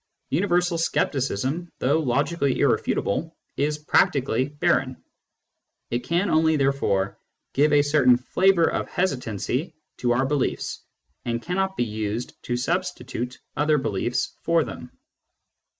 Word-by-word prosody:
Universal 175 Hz, +1 st, +1 dB
scepticism, 140 Hz, -, -1 dB
though 140 Hz, +5 st, +2 dB
logically 140 Hz, +1 st, 0 dB
irrefutable, 165 Hz, +11 st, 0 dB, 0.2 s
is 150 Hz, +1 st, 0 dB
practically 135 Hz, -4 st, +2 dB
barren; 145 Hz, 0 st, 0 dB, 0.9 s
it 120 Hz, -, +1 dB
can 175 Hz, +7 st, 0 dB
only, 160 Hz, 0 st, +4 dB
therefore, 135 Hz, -9 st, 0 dB, 0.3 s
give 145 Hz, +2 st, +3 dB
a 145 Hz, -1 st, +5 dB
certain 145 Hz, -4 st, +4 dB
flavour 175 Hz, +7 st, +3 dB
of -, -, -2 dB
hesitancy 135 Hz, -, -2 dB, 0.2 s
to 120 Hz, -, 0 dB
our 130 Hz, +3 st, +1 dB
beliefs, 140 Hz, -1 st, -1 dB, 0.4 s
and 115 Hz, -1 st, -1 dB
cannot 190 Hz, +2 st, -1 dB
be 120 Hz, -, +1 dB
used 110 Hz, +1 st, -3 dB
to 120 Hz, -, -2 dB
substitute 130 Hz, -5 st, -3 dB, 0.2 s
other 150 Hz, +1 st, +3 dB
beliefs 120 Hz, -2 st, -1 dB
for 165 Hz, -1 st, +2 dB
them. 125 Hz, -, -8 dB
145 Hz, 120 wpm, -24 LUFS, 125-165 Hz, 0.9 s, a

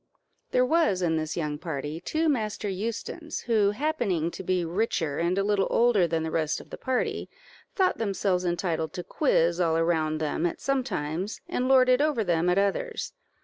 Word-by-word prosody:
There 250 Hz, -, +3 dB
was 255 Hz, -, +2 dB
in 160 Hz, -2 st, +1 dB
this 155 Hz, +1 st, -3 dB
young 150 Hz, -3 st, -2 dB
party 150 Hz, -1 st, -4 dB
two 315 Hz, -, -1 dB
Master 220 Hz, -7 st, -1 dB
Eustons, 230 Hz, -, -4 dB
who, 220 Hz, -4 st, +2 dB
happening 210 Hz, -, -1 dB
to -, -, -7 dB
be 180 Hz, -1 st, 0 dB
richer 165 Hz, -5 st, -1 dB
and 170 Hz, +2 st, +1 dB
a 195 Hz, -, +2 dB
little 200 Hz, -1 st, +1 dB
older 230 Hz, -7 st, +3 dB
than 165 Hz, -1 st, -1 dB
the 160 Hz, -, -3 dB
rest 160 Hz, -1 st, 0 dB
of -, -, -14 dB
the -, -, -6 dB
party, 260 Hz, -2 st, -1 dB, 0.5 s
thought 375 Hz, -2 st, +2 dB
themselves 195 Hz, -4 st, 0 dB
entitled 175 Hz, -2 st, -1 dB
to 180 Hz, -, -5 dB
quiz 170 Hz, -, +1 dB
all 165 Hz, -2 st, +2 dB
around 160 Hz, -2 st, +1 dB
them 155 Hz, +2 st, 0 dB
at 170 Hz, -, -5 dB
some 275 Hz, -1 st, 0 dB
times, 170 Hz, -, -3 dB
and 250 Hz, -, -1 dB
lord 260 Hz, -1 st, +6 dB
it 255 Hz, +2 st, +4 dB
over 295 Hz, -7 st, +1 dB
them 175 Hz, -2 st, +1 dB
at 180 Hz, -, +2 dB
others. 315 Hz, -, -1 dB
185 Hz, 190 wpm, -27 LUFS, 165-240 Hz, 0.5 s, lord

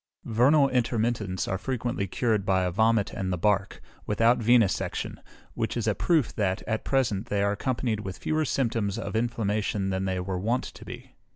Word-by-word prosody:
Vernal 135 Hz, +6 st, +4 dB
intermittents 115 Hz, -6 st, 0 dB
are 95 Hz, -, -2 dB
frequently 120 Hz, -5 st, -2 dB
cured 110 Hz, +1 st, 0 dB
by 95 Hz, -2 st, +2 dB
a 90 Hz, -, 0 dB
vomit 110 Hz, +2 st, +2 dB
and 95 Hz, -1 st, -3 dB
the 90 Hz, -, -1 dB
bark, 100 Hz, +2 st, 0 dB, 0.2 s
without 115 Hz, +3 st, +3 dB
venæsection, 115 Hz, -3 st, +1 dB, 0.3 s
which -, -, -2 dB
is -, -, -1 dB
a -, -, +2 dB
proof 160 Hz, -9 st, +1 dB
that, 95 Hz, -3 st, -1 dB
at 110 Hz, -1 st, -2 dB
present, 115 Hz, -6 st, 0 dB
they 100 Hz, -3 st, 0 dB
are 100 Hz, -, +2 dB
accompanied 115 Hz, +1 st, -1 dB
with 95 Hz, -3 st, -6 dB
fewer 155 Hz, 0 st, 0 dB
symptoms 115 Hz, -7 st, -1 dB
of 115 Hz, -, -5 dB
inflammation 105 Hz, -3 st, -1 dB
than 95 Hz, 0 st, -1 dB
they 95 Hz, -1 st, -1 dB
were 90 Hz, 0 st, -3 dB
wont 115 Hz, +6 st, 0 dB
to -, -, -10 dB
be. -, -, -10 dB
110 Hz, 180 wpm, -27 LUFS, 95-120 Hz, 0.3 s, Vernal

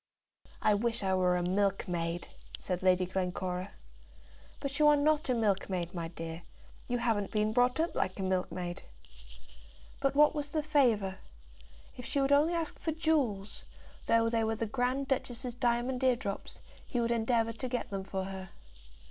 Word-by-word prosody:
"I 210 Hz, -, +5 dB
wish 225 Hz, +1 st, 0 dB
I 190 Hz, -1 st, +1 dB
were 180 Hz, -1 st, +3 dB
a 175 Hz, -, -1 dB
milkmaid," 180 Hz, -3 st, -1 dB, 0.3 s
said 180 Hz, -1 st, -3 dB
Lady 185 Hz, -1 st, +4 dB
Glencora. 185 Hz, 0 st, -3 dB, 0.9 s
"But 280 Hz, +1 st, -4 dB
you 300 Hz, -, +6 dB
are 295 Hz, -, +7 dB
not 295 Hz, 0 st, +2 dB
a 250 Hz, -, +3 dB
milkmaid, 190 Hz, -5 st, 0 dB
my 170 Hz, -2 st, -3 dB
dear. 165 Hz, 0 st, -7 dB, 0.5 s
You 245 Hz, -, 0 dB
haven't 220 Hz, -4 st, 0 dB
been 215 Hz, 0 st, 0 dB
brought 245 Hz, +4 st, +3 dB
up 330 Hz, +1 st, +1 dB
like 185 Hz, -, -1 dB
a -, -, -1 dB
milkmaid." 180 Hz, -1 st, -2 dB, 1.2 s
But 275 Hz, 0 st, +1 dB
what 300 Hz, +2 st, +6 dB
was 295 Hz, -2 st, -3 dB
the 305 Hz, +1 st, -1 dB
favour? 230 Hz, -, +2 dB, 0.8 s
If 250 Hz, -, -8 dB
she 280 Hz, -, 0 dB
would 275 Hz, 0 st, +2 dB
only 300 Hz, +4 st, +4 dB
ask 330 Hz, -2 st, -3 dB
for 320 Hz, -, -1 dB
jewels, 285 Hz, -11 st, 0 dB, 0.4 s
though 230 Hz, 0 st, +4 dB
they 230 Hz, -1 st, +1 dB
were 220 Hz, 0 st, 0 dB
the 225 Hz, +1 st, -2 dB
Grand 250 Hz, +4 st, -1 dB
Duchess's 255 Hz, -2 st, -2 dB
diamond 245 Hz, +1 st, 0 dB
eardrops, 240 Hz, -6 st, -1 dB, 0.3 s
he 245 Hz, -, -1 dB
would 235 Hz, 0 st, +1 dB
endeavour 230 Hz, 0 st, +1 dB
to 250 Hz, +3 st, -5 dB
get 245 Hz, -3 st, -3 dB
them 195 Hz, -1 st, -3 dB
for 190 Hz, 0 st, -3 dB
her. 190 Hz, -1 st, -6 dB
225 Hz, 165 wpm, -31 LUFS, 190-260 Hz, 1.2 s, are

